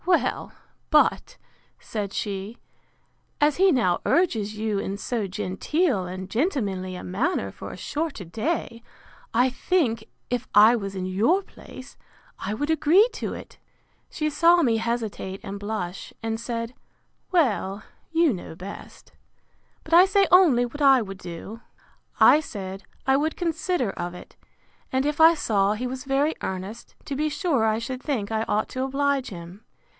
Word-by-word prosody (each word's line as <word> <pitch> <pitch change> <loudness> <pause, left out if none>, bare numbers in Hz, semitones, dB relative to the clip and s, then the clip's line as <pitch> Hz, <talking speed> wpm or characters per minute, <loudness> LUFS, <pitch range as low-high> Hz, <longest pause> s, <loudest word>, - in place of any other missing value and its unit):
Well, 355 -1 +1 0.4
but, - - +3 0.4
said 205 -3 -4
she, 200 +3 -4 0.8
as 295 -1 +3
he 380 +1 +5
now 230 - +2
urges 220 - +1
you 215 -2 -1
in 195 0 -3
so 220 -1 -2
genteel 195 - -1
and 185 +1 -6
gentlemanly 200 - -1
a - - -7
manner 240 - -1
for - - -9
a - - -9
shorter 300 - -4
day, 230 - -3 0.5
I 250 +3 +3
think, 250 -7 0 0.3
if 245 0 -1
I 215 +3 +8
was 200 -3 -4
in 185 -1 -3
your 225 - +2
place, 260 -7 -13 0.4
I 200 - -3
would 290 +7 -1
agree 320 +8 +5
to - - -4
it. - - -11 0.5
She 305 -2 -2
saw 340 +3 +5
me 230 -3 +3
hesitate 220 -4 -3
and 200 -1 -6
blush, 200 -3 -5
and 225 0 -2
said, 230 0 -4 0.6
Well, 215 - +1 0.3
you 330 -4 +3
know 175 -3 -7
best; 190 +4 -10 0.7
but 315 - -6
I 350 +2 +9
say 395 0 +3
only 325 -10 +6
what 290 +5 -8
I 270 -4 +6
would 195 -2 -8
do. 180 +6 -8 0.6
I 300 - +7
said, 195 -9 -7 0.2
I 265 0 +4
would 310 +3 -1
consider 335 - -1
of 175 -1 -5
it; - - -12 0.6
and 260 +1 +1
if 295 +1 0
I 325 +1 +8
saw 205 -8 +1
he 230 +4 -4
was 255 0 -5
very 280 +3 +1
earnest, 190 +5 -6
to 280 - -4
be 305 +2 0
sure 290 - +1
I 220 0 +2
should 255 +3 -5
think 230 -9 -2
I 220 0 0
ought 210 +1 +1
to 260 - -3
oblige 275 0 0
him. 180 +3 -10
235 Hz, 160 wpm, -25 LUFS, 200-300 Hz, 0.8 s, I